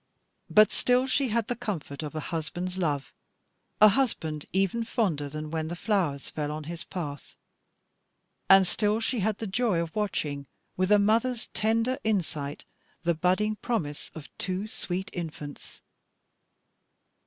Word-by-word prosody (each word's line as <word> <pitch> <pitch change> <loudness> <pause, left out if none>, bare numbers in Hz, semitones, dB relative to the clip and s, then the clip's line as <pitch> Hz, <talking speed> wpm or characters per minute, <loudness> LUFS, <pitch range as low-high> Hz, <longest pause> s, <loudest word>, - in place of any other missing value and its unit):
But 215 -1 +6
still 250 +1 +3
she 265 +1 +2
had 230 -1 +1
the 245 - -1
comfort 170 -11 -4
of 150 0 -6
a - - -1
husband's 175 +3 -3
love, 150 -7 -1 0.7
a 215 - +9
husband 165 - 0
even 195 +5 +1
fonder 175 -11 0
than 155 +1 -5
when 160 -1 -1
the 170 - -4
flowers 175 -8 0
fell 150 -1 -2
on 155 0 -4
his 165 +2 -6
path; 150 -6 -6 1.1
and 195 0 +9
still 210 +4 +1
she 230 +1 0
had 210 +1 +1
the 225 - -4
joy 210 -2 +1
of 170 -1 -3
watching, 150 -9 -2 0.3
with 185 +2 +1
a 210 - +8
mother's 225 +4 +2
tender 230 +4 +1
insight, 160 -9 -1 0.4
the 170 0 +3
budding 185 +6 +1
promise 160 -14 -2
of 155 -3 -10
two 185 +2 -2
sweet 190 -3 -4
infants. 155 -4 -7
185 Hz, 145 wpm, -28 LUFS, 155-215 Hz, 1.1 s, a